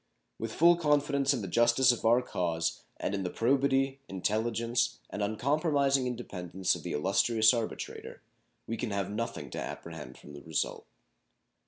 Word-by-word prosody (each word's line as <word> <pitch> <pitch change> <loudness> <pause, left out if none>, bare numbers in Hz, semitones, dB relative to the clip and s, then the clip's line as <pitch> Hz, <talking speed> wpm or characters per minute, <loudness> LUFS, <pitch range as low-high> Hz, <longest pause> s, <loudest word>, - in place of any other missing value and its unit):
With 115 0 -4
full 170 +2 +5
confidence 145 -3 +2
in 125 -6 -1
the - - -4
justice 120 +6 +4
of 120 - -4
our 120 +3 +5
cause 85 -7 -2 0.2
and - - -3
in 100 - -1
the 90 - -2
probity, 135 +4 +1
intelligence, 115 +5 0
and - - -4
uncompromising 140 +4 +1
independence 95 -7 -2
of - - -5
the - - -5
illustrious 110 +8 +3
arbitrator, 115 -2 -5 0.4
we 115 - -4
can 115 +1 -3
have 100 -1 -2
nothing 105 -9 -4
to - - -4
apprehend 80 -3 -7
from 75 - -13
the 70 - -10
result. 80 -2 -3
115 Hz, 155 wpm, -30 LUFS, 95-135 Hz, 0.4 s, full